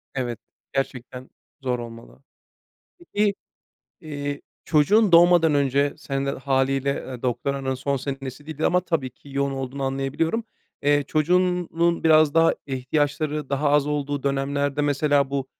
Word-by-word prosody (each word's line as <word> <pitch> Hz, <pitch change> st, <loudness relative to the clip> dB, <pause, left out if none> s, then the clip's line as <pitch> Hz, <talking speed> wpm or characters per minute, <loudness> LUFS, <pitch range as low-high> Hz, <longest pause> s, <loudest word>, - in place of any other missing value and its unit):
Evet, 120 Hz, -4 st, -3 dB, 0.3 s
gerçekten 130 Hz, -1 st, -4 dB, 0.3 s
zor 125 Hz, -2 st, -1 dB
olmalı. 115 Hz, +3 st, -11 dB, 0.8 s
Peki, 210 Hz, -, 0 dB, 0.7 s
eee, 145 Hz, -2 st, -5 dB, 0.2 s
çocuğun 190 Hz, +6 st, +3 dB
doğmadan 170 Hz, -2 st, +6 dB
önce, 140 Hz, 0 st, +1 dB
sen 135 Hz, 0 st, -3 dB
de -, -, +1 dB
hâliyle, 135 Hz, +1 st, 0 dB
ııı, 125 Hz, -2 st, -8 dB
doktoranın 135 Hz, +2 st, -1 dB
son 140 Hz, +2 st, -1 dB
senesiydi 140 Hz, +3 st, -4 dB
ama 180 Hz, -, +3 dB
tabii 165 Hz, -8 st, -2 dB
ki 140 Hz, -, -19 dB
yoğun 140 Hz, 0 st, 0 dB
olduğunu 135 Hz, +1 st, -5 dB
anlayabiliyorum. 135 Hz, -, -1 dB, 0.4 s
Eee, 145 Hz, 0 st, +3 dB
çocuğunun 170 Hz, +1 st, +1 dB
biraz 155 Hz, -1 st, +6 dB
daha 165 Hz, +3 st, +3 dB, 0.2 s
ihtiyaçları, 145 Hz, +2 st, -1 dB
daha 145 Hz, +1 st, +1 dB
az 145 Hz, -1 st, +3 dB
olduğu 145 Hz, -1 st, -2 dB
dönemlerde, 140 Hz, +1 st, -1 dB
mesela, 145 Hz, -1 st, +2 dB
bu 135 Hz, -1 st, -2 dB
140 Hz, 125 wpm, -24 LUFS, 135-155 Hz, 0.8 s, doğmadan